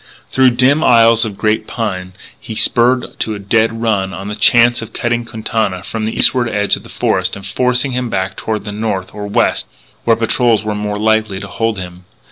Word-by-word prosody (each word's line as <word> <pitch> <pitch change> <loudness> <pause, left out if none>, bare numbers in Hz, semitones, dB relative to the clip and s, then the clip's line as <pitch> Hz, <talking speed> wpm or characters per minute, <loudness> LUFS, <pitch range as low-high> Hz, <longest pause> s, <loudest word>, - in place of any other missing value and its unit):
Through 130 -1 +4
dim 140 +5 +4
aisles 115 -1 +5
of 105 -3 -7
giant 110 0 0
pine 95 -5 -4 0.3
he 110 - -8
spurred 125 +3 +1
to 110 - -2
a - - -5
dead 115 +3 0
run 100 -5 0
on 95 +3 -6
the 105 - -4
chance 120 +3 +4
of 115 - -9
cutting 120 0 -1
Quintana 110 -4 -2
from 110 +3 -4
the 110 - -3
eastward 120 -2 +3
edge 105 -2 +1
of - - -10
the - - -15
forest - - -1
and 100 -1 -9
forcing 125 +5 0
him 125 -1 -2
back 95 -2 -2
toward 110 -2 -4
the 105 - -5
north 105 -3 -3
or 105 -1 -6
west, 100 - +1 0.4
where 115 - +3
patrols 115 0 +1
were 105 0 -2
more 105 0 -3
than 105 - -4
likely 110 -3 +1
to 100 - -7
hold 115 +2 -2
him. 90 -1 -8
110 Hz, 210 wpm, -15 LUFS, 100-115 Hz, 0.4 s, aisles